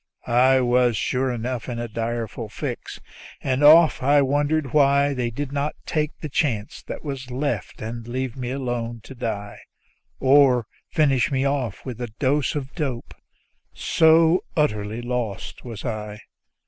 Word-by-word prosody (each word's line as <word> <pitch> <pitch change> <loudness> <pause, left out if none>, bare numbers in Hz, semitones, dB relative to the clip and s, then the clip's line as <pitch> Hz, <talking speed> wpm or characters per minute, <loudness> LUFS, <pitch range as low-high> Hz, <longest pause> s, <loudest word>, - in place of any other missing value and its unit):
I 130 +2 +4
was 120 -2 +3
sure 130 +6 0
enough 120 +1 -4
in 120 - -4
a 120 0 -3
direful 115 0 -4
fix, - - -6 0.4
and 130 +1 -1
often 155 -3 +6
I 145 0 +5
wondered 145 +1 0
why 140 -1 +4
They 125 -3 -1
did 140 +4 -5
not 145 +1 -2
take 150 -1 -2
the 155 - -4
chance 125 -8 -1
that - - -6
was 135 -3 -5
left 125 -6 -3
and 115 +1 -6
leave 130 0 -3
me 125 -2 -4
alone 120 -3 -3
to - - -10
die, 105 -5 -5 0.6
Or 130 -3 +5 0.2
finish 140 -6 +2
me 135 0 +1
off 135 -7 -2
with 125 -3 -6
a 120 - -2
dose 145 +2 +1
of 140 -2 -4
dope 135 -8 -4 0.6
so 165 +2 +4
utterly 110 -5 0
lost 120 -5 -4
was 115 -2 -8
I. 105 -2 -5
130 Hz, 150 wpm, -23 LUFS, 120-140 Hz, 0.6 s, often